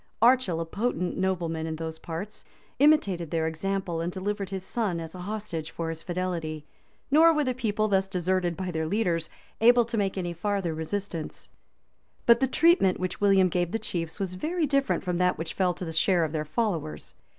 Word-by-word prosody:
Archil, 235 -8 +4
a 165 - -2
potent 180 -1 -2
nobleman 170 -4 -1
in 160 - -3
those 160 0 -5
parts, 170 +6 -6 0.4
imitated 200 - +3
their 160 0 0
example, 170 +1 -2
and 170 +2 -2
delivered 200 +1 -3
his 190 -1 -5
son 200 -6 -1
as 160 -1 -7
a 185 - -9
hostage 180 -5 -4
for 165 -1 -4
his 165 0 -5
fidelity;[] 170 -4 -3 0.5
nor 320 +3 +7
were 305 -2 +2
the 255 -2 0
people, 215 -4 0
thus 195 -2 +2
deserted 180 -2 0
by 185 -1 -3
their 160 -1 -2
leaders, 170 -4 0 0.3
able 240 +1 +6
to 230 0 -3
make 195 -1 -1
any 175 -2 -2
farther 195 -1 -1
resistance. 165 +1 -5 0.7
But 235 0 +6
the 265 - +2
treatment 280 - +4
which 185 +1 -3
William 195 -2 +5
gave 175 -1 -1
the - - +2
chiefs 165 -7 -4
was 190 -2 -2
very 320 - -1
different 275 -1 +1
from 180 -2 -1
that 180 0 +2
which 165 - -4
fell 180 -2 +1
to 180 - -5
the 160 - -5
share 175 +2 +3
of 155 - -1
their 155 -1 -2
followers. 160 - -2
185 Hz, 195 wpm, -27 LUFS, 165-210 Hz, 0.7 s, nor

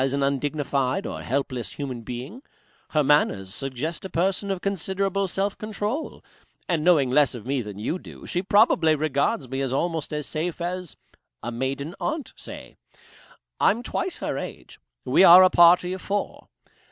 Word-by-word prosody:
as 135 0 +1
an 140 0 0
undignified 140 -1 -1
or - - -5
helpless 130 -2 -3
human 130 -5 -5
being. 125 - -7 0.5
Her 155 -1 +2
manners 100 -10 +2
suggest 135 +6 -4
a 190 - -6
person 190 +4 0
of 195 -2 -1
considerable 195 +1 -1
self 195 +2 -1
control. 215 +7 -4 0.4
And 165 -4 0
knowing 155 -7 +4
less 140 -1 +3
of 115 - -9
me 135 0 -1
than 105 -3 -8
you 135 - -3
do, - - -12
she 175 - -1
probably 195 -6 +4
regards 150 - 0
me 135 +2 -3
as 135 -2 -1
almost 160 +3 -1
as 150 -1 -3
safe 165 +3 -3
as 180 0 -4 0.5
a 120 - -3
maiden 135 +6 -3
aunt 310 -2 -3
say. - - -11 0.8
I'm 230 +4 +3
twice 365 +7 -3
her - - -3
age. - - -9 0.3
We - - +4
are 185 0 +10
a 185 - +5
party 175 +1 +6
of 185 - -6
four. 205 0 -3
155 Hz, 165 wpm, -24 LUFS, 135-190 Hz, 0.8 s, are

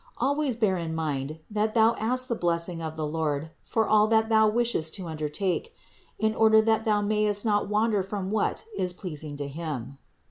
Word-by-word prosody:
Always 280 0 +1
bear 210 -5 +1
in 165 -2 -3
mind 155 -1 -3
that 215 +1 0
thou 225 0 +5
ask 255 +3 0
the 240 - 0
blessing 170 -3 -1
of 160 -1 -5
the 155 -1 -2
Lord 155 0 -2
for 225 -1 0
all 215 0 +5
that 220 0 +2
thou 220 -1 +5
wishest 230 -8 0
to 190 -3 -5
under 155 -2 -4
take, 200 - -2 0.4
in 220 0 +1
order 220 0 +5
that 220 +1 +2
thou 210 -2 +2
mayest 210 0 +1
not 205 -2 +1
wander 210 -1 +2
from 195 0 -4
what 220 - -1
is 180 - -1
pleasing 155 -5 -7
to 145 -1 -4
Him. 140 -3 -6
205 Hz, 190 wpm, -27 LUFS, 160-220 Hz, 0.4 s, thou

